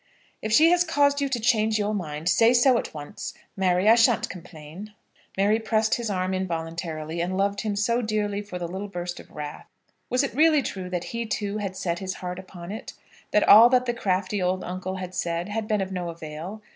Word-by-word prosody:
"If 215 Hz, -, -3 dB
she 315 Hz, +9 st, +6 dB
has 355 Hz, 0 st, +4 dB
caused 285 Hz, -3 st, +2 dB
you 280 Hz, -, 0 dB
to 255 Hz, -2 st, -1 dB
change 220 Hz, -2 st, +2 dB
your 210 Hz, 0 st, -1 dB
mind, 160 Hz, -5 st, -4 dB
say 230 Hz, +6 st, +5 dB
so 245 Hz, 0 st, +5 dB
at -, -, -6 dB
once, 150 Hz, +6 st, -7 dB, 0.2 s
Mary. 185 Hz, 0 st, +2 dB
I 220 Hz, -, +9 dB
shan't 230 Hz, 0 st, +3 dB
complain." 175 Hz, +3 st, -10 dB, 0.4 s
Mary 205 Hz, +3 st, +3 dB
pressed 220 Hz, -1 st, +1 dB
his 235 Hz, -2 st, -1 dB
arm 185 Hz, -1 st, -1 dB
involuntarily, 165 Hz, -2 st, -3 dB
and 185 Hz, +2 st, -2 dB
loved 200 Hz, +1 st, 0 dB
him 215 Hz, -2 st, -2 dB
so 235 Hz, +4 st, +1 dB
dearly 210 Hz, -2 st, -1 dB
for 205 Hz, -3 st, -7 dB
the 175 Hz, -1 st, -4 dB
little 190 Hz, +4 st, -5 dB
burst 175 Hz, -2 st, -5 dB
of -, -, -13 dB
wrath. 150 Hz, -1 st, -8 dB, 0.4 s
Was 250 Hz, +2 st, +2 dB
it 275 Hz, -, -3 dB
really 305 Hz, 0 st, +4 dB
true 185 Hz, -2 st, -5 dB
that 180 Hz, -1 st, -2 dB
he, 230 Hz, 0 st, -3 dB
too, 210 Hz, -1 st, -2 dB
had 195 Hz, -2 st, -4 dB
set 170 Hz, -2 st, -2 dB
his 190 Hz, 0 st, -4 dB
heart 180 Hz, 0 st, -5 dB
upon 185 Hz, -1 st, -9 dB
it? 220 Hz, -, -7 dB, 0.4 s
that 210 Hz, -, +2 dB
all 225 Hz, +4 st, +9 dB
that 255 Hz, 0 st, +3 dB
the 240 Hz, -, 0 dB
crafty 195 Hz, -2 st, -1 dB
old 185 Hz, +1 st, 0 dB
uncle 185 Hz, +1 st, -4 dB
had 185 Hz, -1 st, -6 dB
said 170 Hz, +1 st, -2 dB
had 215 Hz, 0 st, -3 dB
been 210 Hz, -2 st, +1 dB
of 190 Hz, 0 st, -3 dB
no 180 Hz, -2 st, -3 dB
avail? 165 Hz, +5 st, -8 dB
200 Hz, 215 wpm, -25 LUFS, 180-220 Hz, 0.4 s, I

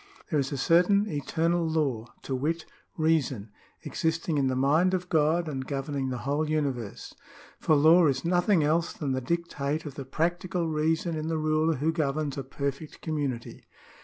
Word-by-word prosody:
" -, -, -25 dB
There 150 Hz, -, +2 dB
is 135 Hz, -1 st, -1 dB
a 140 Hz, -, -2 dB
certain 180 Hz, +8 st, +4 dB
eternal 165 Hz, +2 st, 0 dB
law, 145 Hz, -8 st, -1 dB, 0.2 s
to 135 Hz, -, -4 dB
wit, 160 Hz, +5 st, -1 dB, 0.3 s
reason, 140 Hz, -10 st, 0 dB, 0.3 s
existing 160 Hz, -1 st, -1 dB
in 135 Hz, -, +2 dB
the 130 Hz, -, 0 dB
mind 155 Hz, +8 st, +3 dB
of 180 Hz, 0 st, -4 dB
God 160 Hz, +2 st, +2 dB
and 135 Hz, -3 st, -3 dB
governing 135 Hz, 0 st, -3 dB
the 125 Hz, -, -3 dB
whole 150 Hz, +2 st, 0 dB
uni 155 Hz, -3 st, +1 dB
verse.... 115 Hz, -5 st, -8 dB, 0.5 s
For 155 Hz, -, +3 dB
law 160 Hz, +3 st, +6 dB
is 135 Hz, 0 st, -1 dB
nothing 175 Hz, 0 st, +3 dB
else 165 Hz, +3 st, +1 dB
than 145 Hz, -4 st, -3 dB
the 130 Hz, 0 st, -1 dB
dictate 155 Hz, 0 st, -2 dB
of 145 Hz, -, -6 dB
the 140 Hz, -1 st, -7 dB
practical 170 Hz, +4 st, -1 dB
reason 160 Hz, +2 st, 0 dB
in 155 Hz, 0 st, -3 dB
the 165 Hz, 0 st, -1 dB
ruler 155 Hz, +1 st, +1 dB
who 155 Hz, +5 st, 0 dB
governs 150 Hz, -2 st, -1 dB
a 140 Hz, -, -4 dB
perfect 140 Hz, +3 st, -5 dB
com 155 Hz, -2 st, -2 dB
munity." 130 Hz, -5 st, -4 dB
155 Hz, 185 wpm, -28 LUFS, 140-165 Hz, 0.5 s, law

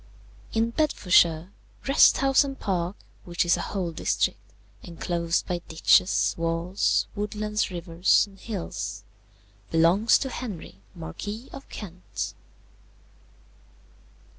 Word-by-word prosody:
"In 230 Hz, +1 st, +1 dB
Bedfordshire, 180 Hz, -, +3 dB, 0.4 s
Wrest 275 Hz, -, +6 dB
House 270 Hz, 0 st, +4 dB
and 275 Hz, -1 st, -6 dB
Park, 180 Hz, -1 st, -1 dB, 0.3 s
which 175 Hz, 0 st, -1 dB
is 175 Hz, -, +4 dB
a -, -, -3 dB
whole 185 Hz, -4 st, -3 dB
district, 160 Hz, -, 0 dB, 0.4 s
enclosed 170 Hz, +1 st, -2 dB
by 175 Hz, -1 st, -2 dB
ditches, 165 Hz, +3 st, +3 dB
walls, 165 Hz, +3 st, +1 dB
woodlands, 210 Hz, +1 st, -2 dB
rivers, 170 Hz, -1 st, +2 dB
and 195 Hz, -2 st, -18 dB
hills, 205 Hz, -7 st, -5 dB, 0.7 s
belongs 170 Hz, +7 st, +4 dB
to 265 Hz, -, -3 dB
Henry, 200 Hz, -, -7 dB
Marquis 205 Hz, -, -7 dB
of 275 Hz, -, -10 dB
Kent. 175 Hz, -, -6 dB
180 Hz, 105 wpm, -26 LUFS, 170-215 Hz, 0.7 s, Wrest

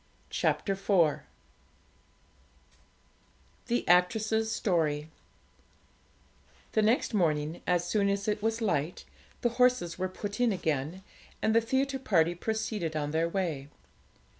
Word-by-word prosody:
CHAPTER 195 Hz, -, 0 dB
IV 190 Hz, -5 st, +2 dB, 2.5 s
THE 240 Hz, 0 st, -1 dB
ACTRESS'S 220 Hz, +5 st, +3 dB
STORY 160 Hz, -7 st, 0 dB, 1.6 s
The 220 Hz, -, +2 dB
next 225 Hz, +3 st, +2 dB
morning, 155 Hz, -4 st, 0 dB
as 175 Hz, -1 st, +1 dB
soon 200 Hz, 0 st, +2 dB
as 200 Hz, +1 st, -1 dB
it 210 Hz, 0 st, 0 dB
was 225 Hz, +1 st, -1 dB
light, 175 Hz, -6 st, -1 dB, 0.4 s
the 240 Hz, -, +2 dB
horses 250 Hz, -10 st, +3 dB
were 185 Hz, 0 st, -1 dB
put 205 Hz, +3 st, -6 dB
in 245 Hz, -2 st, +3 dB
again, 160 Hz, -1 st, -2 dB, 0.4 s
and 220 Hz, -, +1 dB
the 230 Hz, -, +6 dB
theatre 265 Hz, +3 st, 0 dB
party 175 Hz, -9 st, +2 dB
proceeded 210 Hz, -3 st, -3 dB
on 150 Hz, -1 st, -2 dB
their 165 Hz, +2 st, +1 dB
way. 165 Hz, -7 st, -2 dB
190 Hz, 115 wpm, -29 LUFS, 165-220 Hz, 2.5 s, the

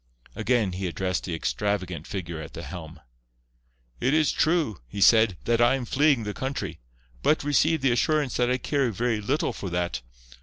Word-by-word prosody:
Again 110 Hz, -2 st, +1 dB
he 95 Hz, +1 st, -3 dB
addressed 95 Hz, +2 st, -2 dB
the 85 Hz, -, -3 dB
extravagant 90 Hz, -2 st, -2 dB
figure 85 Hz, -5 st, -5 dB
at 80 Hz, 0 st, -9 dB
the 85 Hz, -, -7 dB
helm. 80 Hz, +2 st, -9 dB, 1.0 s
"It 135 Hz, -, +2 dB
is 155 Hz, -2 st, +3 dB
true," 155 Hz, -, +1 dB
he 100 Hz, -, -7 dB
said, 110 Hz, -2 st, +5 dB
"that 120 Hz, 0 st, +2 dB
I 120 Hz, +3 st, +5 dB
am 130 Hz, -2 st, -4 dB
fleeing 140 Hz, -1 st, +3 dB
the 105 Hz, -1 st, -4 dB
country. 135 Hz, +4 st, -4 dB, 0.4 s
But, 155 Hz, -, +2 dB
receive 145 Hz, +2 st, +2 dB
the 135 Hz, -1 st, +3 dB
assurance 145 Hz, +2 st, +1 dB
that 125 Hz, 0 st, +2 dB
I 125 Hz, -, +2 dB
care 135 Hz, 0 st, 0 dB
very 115 Hz, 0 st, -1 dB
little 135 Hz, +9 st, 0 dB
for 95 Hz, -, -5 dB
that. 85 Hz, -5 st, -2 dB
115 Hz, 180 wpm, -26 LUFS, 90-135 Hz, 1.0 s, said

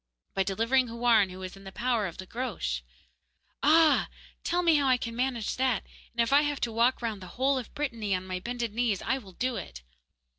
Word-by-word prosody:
'By 195 Hz, -, +1 dB
delivering 230 Hz, +7 st, +2 dB
Houarn, 230 Hz, -3 st, +3 dB
who 185 Hz, +1 st, -8 dB
is 185 Hz, 0 st, -6 dB
in 195 Hz, -, -14 dB
the 195 Hz, -, -8 dB
power 235 Hz, -2 st, 0 dB
of 170 Hz, -, -9 dB
the 185 Hz, -, -7 dB
Groac'h.' 195 Hz, -, -3 dB, 0.8 s
'Ah! 315 Hz, +2 st, +5 dB, 0.3 s
tell 355 Hz, +1 st, +1 dB
me 335 Hz, -2 st, +5 dB
how 280 Hz, -1 st, +2 dB
I 255 Hz, -1 st, +5 dB
can 230 Hz, -1 st, -5 dB
manage 245 Hz, -3 st, -1 dB
that, 255 Hz, -4 st, +1 dB, 0.3 s
and 235 Hz, -, +1 dB
if 230 Hz, -, 0 dB
I 285 Hz, -, +7 dB
have 290 Hz, -1 st, -1 dB
to 235 Hz, -, 0 dB
walk 235 Hz, +3 st, +2 dB
round 220 Hz, -4 st, -2 dB
the 185 Hz, -, -8 dB
whole 265 Hz, +1 st, +2 dB
of 245 Hz, -, -8 dB
Brittany 230 Hz, -9 st, -1 dB
on 185 Hz, 0 st, -4 dB
my 185 Hz, -1 st, -3 dB
bended 235 Hz, +1 st, -3 dB
knees 230 Hz, -4 st, 0 dB
I 265 Hz, -, 0 dB
will 195 Hz, -6 st, -14 dB
do 255 Hz, +5 st, -1 dB
it! 60 Hz, 0 st, -8 dB
235 Hz, 220 wpm, -29 LUFS, 195-260 Hz, 0.8 s, I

